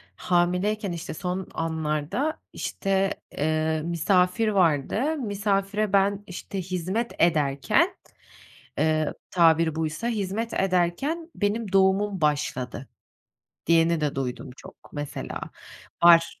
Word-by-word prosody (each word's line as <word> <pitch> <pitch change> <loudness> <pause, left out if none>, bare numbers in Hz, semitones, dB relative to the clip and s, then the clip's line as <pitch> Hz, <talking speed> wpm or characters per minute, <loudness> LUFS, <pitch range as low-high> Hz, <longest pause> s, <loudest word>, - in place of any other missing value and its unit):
hamileyken 180 - 0
işte 170 -1 -5
son 180 +3 -4
anlarda 160 - -2
işte, 195 0 -1 0.3
ııı, 155 +1 0
misafir 180 +5 +2
vardı, 200 - +1
misafire 205 -2 -1
ben 200 +1 +2
işte 190 +1 -5
hizmet 185 +6 -2
ederken, 145 -5 +2 0.8
ııı, 155 0 +1 0.2
tabiri 165 -2 +4
buysa, 160 +8 -2
hizmet 220 +1 -2
ederken 195 - 0
benim 205 0 -1
doğumum 195 -1 +3
başladı, 135 -4 -1 0.8
diyeni 165 0 +3
de 150 -2 -1
duydum 130 -1 -4
çok - - -13 0.2
mesela. 145 -1 -5 0.6
Var. 170 -1 +6
180 Hz, 100 wpm, -25 LUFS, 160-205 Hz, 0.8 s, Var